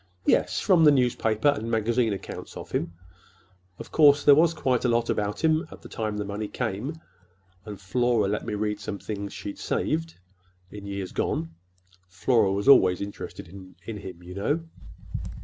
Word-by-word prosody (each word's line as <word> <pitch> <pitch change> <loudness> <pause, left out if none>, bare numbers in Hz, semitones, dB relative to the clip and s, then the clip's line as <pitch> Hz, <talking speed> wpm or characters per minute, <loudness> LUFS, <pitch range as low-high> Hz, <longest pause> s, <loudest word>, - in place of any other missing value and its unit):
"Yes, - - +2
from 175 -4 +4
the 155 - +8
newspaper 125 -3 +2
and 115 -5 -1
magazine 115 +1 +1
accounts 100 - -7
of - - -9
him. 85 - -2 0.8
Of - - -10
course, 145 -2 +5
there 145 - +8
was 160 +3 +5
quite 130 -5 0
a 125 - +2
lot 115 0 +1
about 105 +5 -2
him 160 +1 +2
at - - -13
the - - -11
time 110 -2 -3
the 105 - -3
money 105 +1 -4
came; 125 +8 -4 0.7
and 105 -3 -8
Flora 115 +2 +1
let 105 +2 -2
me - - -3
read 105 0 -2
some 100 - -5
things 100 -1 -5
she'd 100 - -7
saved, 165 +2 -2 0.6
in 100 -1 -9
years 100 -2 -5
gone. 80 0 -2 0.6
Flora 100 +3 +2
was 100 +4 -2
always 95 -10 +6
interested 100 -3 -7
in 95 +3 -10
him, 90 -3 -10
you 90 +1 -9
know." 140 - -1
110 Hz, 170 wpm, -26 LUFS, 100-130 Hz, 0.8 s, the